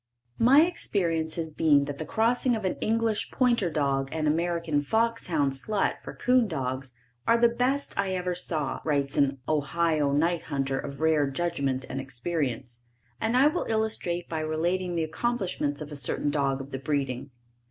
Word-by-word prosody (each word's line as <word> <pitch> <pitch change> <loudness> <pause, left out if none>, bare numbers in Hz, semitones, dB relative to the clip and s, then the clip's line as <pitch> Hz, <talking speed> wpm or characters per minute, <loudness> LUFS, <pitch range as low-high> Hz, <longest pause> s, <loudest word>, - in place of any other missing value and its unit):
My 270 +6 +7
experience 170 - -1
has 160 -2 -3
been 150 -2 +3
that 140 0 -6
the 155 - -5
crossing 240 +2 +2
of 215 -3 -4
an 185 - 0
English 225 -1 0
pointer 240 -8 +2
dog 140 -3 0
and 155 -1 -1
American 165 -1 +1
fox 230 +9 0
hound 145 -5 +1
slut 195 +10 -1
for - - -8
'coon 250 -2 +3
dogs, 130 -5 -3 0.4
are 230 - +5
the 235 0 +5
best 255 +4 -1
I 195 -1 +1
ever 180 0 -1
saw, 160 -5 0
writes 140 -3 0
an 140 -1 +2
Ohio 155 0 +1
night 165 +3 +1
hunter 135 -1 -1
of 140 +1 -7
rare 155 -3 +3
judgment 135 -4 -1
and 135 - -4
experience, 130 -3 -3 0.4
and 225 +3 +1
I 265 - +6
will 310 +4 +1
illustrate 220 -6 -1
by 160 - -3
relating 175 +3 -1
the 165 - +1
accomplishments 160 -5 -2
of 150 0 -7
a - - -5
certain 140 +1 -1
dog 140 -2 0
of 135 +1 -10
the 135 - -4
breeding. 135 -1 -2
160 Hz, 175 wpm, -27 LUFS, 140-200 Hz, 0.4 s, My